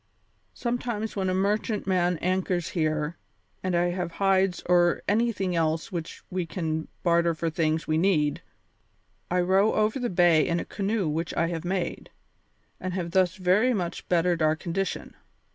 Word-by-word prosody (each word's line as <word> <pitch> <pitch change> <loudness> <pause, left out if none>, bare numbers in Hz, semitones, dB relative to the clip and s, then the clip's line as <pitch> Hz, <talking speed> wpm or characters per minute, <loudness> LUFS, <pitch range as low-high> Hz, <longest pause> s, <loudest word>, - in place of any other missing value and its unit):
Sometimes 235 -3 -3
when 190 -2 0
a - - +1
merchantman 190 -3 +1
anchors 185 -1 0
here 155 -2 -1 0.4
and 185 -1 -1
I 175 +1 +2
have 175 -2 -3
hides 195 -1 +2
or 175 -1 +3
anything 205 -4 +1
else 160 -1 0
which 170 -3 -6
we 185 0 -1
can 160 -2 -3 0.2
barter 170 -1 +3
for 165 +1 -2
things 160 0 0
we 155 0 +1
need, 160 -5 +2 0.9
I 180 0 +2
row 190 +4 +3
over 215 +4 +1
the 245 -1 -1
bay 175 -3 +4
in 170 0 +1
a - - -4
canoe 200 -2 -1
which 160 +3 -2
I 165 - +1
have 165 -2 -4
made, 185 0 -3 0.7
and 185 -1 -4
have 170 -2 -3
thus 185 -1 +2
very 205 +6 +3
much 175 -4 -4
bettered 175 -1 +2
our 155 0 +3
condition. 180 +4 -3
180 Hz, 160 wpm, -26 LUFS, 165-195 Hz, 0.9 s, bay